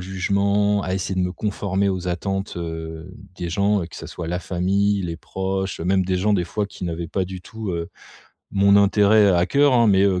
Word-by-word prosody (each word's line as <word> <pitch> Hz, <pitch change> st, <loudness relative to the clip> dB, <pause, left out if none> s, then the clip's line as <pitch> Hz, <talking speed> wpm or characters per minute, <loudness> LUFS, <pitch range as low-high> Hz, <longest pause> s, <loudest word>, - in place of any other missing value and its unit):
jugements, 100 Hz, +2 st, +1 dB
à 90 Hz, -, -3 dB
essayer 95 Hz, 0 st, -2 dB
de 95 Hz, -, 0 dB
me 90 Hz, -, -2 dB
conformer 100 Hz, -1 st, -1 dB
aux 90 Hz, -2 st, -2 dB
attentes, 95 Hz, +2 st, -3 dB
heu, 80 Hz, 0 st, -6 dB, 0.2 s
des 85 Hz, -, -4 dB
gens. 100 Hz, +4 st, +1 dB
Que 85 Hz, -, -12 dB
ce -, -, -8 dB
soit 85 Hz, -2 st, -6 dB
la 90 Hz, +2 st, -2 dB
famille, 100 Hz, +3 st, 0 dB
les 85 Hz, -2 st, -4 dB
proches, 95 Hz, +2 st, -3 dB
même 95 Hz, +2 st, +1 dB
des 90 Hz, 0 st, 0 dB
gens 105 Hz, +4 st, +1 dB
des 90 Hz, -3 st, +1 dB
fois 105 Hz, +4 st, -2 dB
qui 100 Hz, -, -9 dB
n'avaient 85 Hz, -1 st, -4 dB
pas 95 Hz, +3 st, -1 dB
du 95 Hz, 0 st, -7 dB
tout, 110 Hz, +2 st, -6 dB
heu, 85 Hz, -1 st, -3 dB, 0.6 s
mon 100 Hz, 0 st, +4 dB
intérêt 100 Hz, +1 st, +5 dB
à 90 Hz, 0 st, +3 dB
coeur, 145 Hz, -1 st, +3 dB
hein. 120 Hz, -2 st, +5 dB
Mais, 95 Hz, -2 st, +4 dB
heu, 95 Hz, -2 st, +2 dB
95 Hz, 210 wpm, -22 LUFS, 90-100 Hz, 0.6 s, intérêt